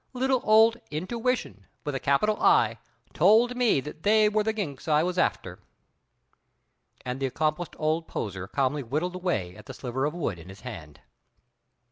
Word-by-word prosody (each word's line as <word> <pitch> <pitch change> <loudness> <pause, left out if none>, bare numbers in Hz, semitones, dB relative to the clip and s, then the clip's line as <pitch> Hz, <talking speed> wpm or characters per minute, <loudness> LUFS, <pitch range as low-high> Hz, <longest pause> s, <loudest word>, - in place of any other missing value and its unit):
Little 260 0 +1
old 220 +2 +5
Intuition, 205 - -3 0.2
with 145 - -3
a 135 - -2
capital 210 +12 +1
I, - - +4 0.3
told 240 +3 +4
me 245 - +3
that 150 +3 -9
they 215 +2 +4
were 215 0 +1
the 220 +1 0
ginks 170 -12 -5
I 155 0 +3
was 180 +1 -1
after." 90 +1 -1 1.5
And 125 +1 -4
the 135 - 0
accomplished 155 +5 -2
old 160 +1 -1
poser 95 -3 -5
calmly 140 +5 0
whittled 150 +9 -2
away 170 - -2
at - - -14
the 130 - -8
sliver 130 +2 -3
of 150 +3 -2
wood 120 - -3
in 85 +3 -12
his 95 +1 -12
hand. 80 - -9
155 Hz, 165 wpm, -27 LUFS, 130-215 Hz, 1.5 s, old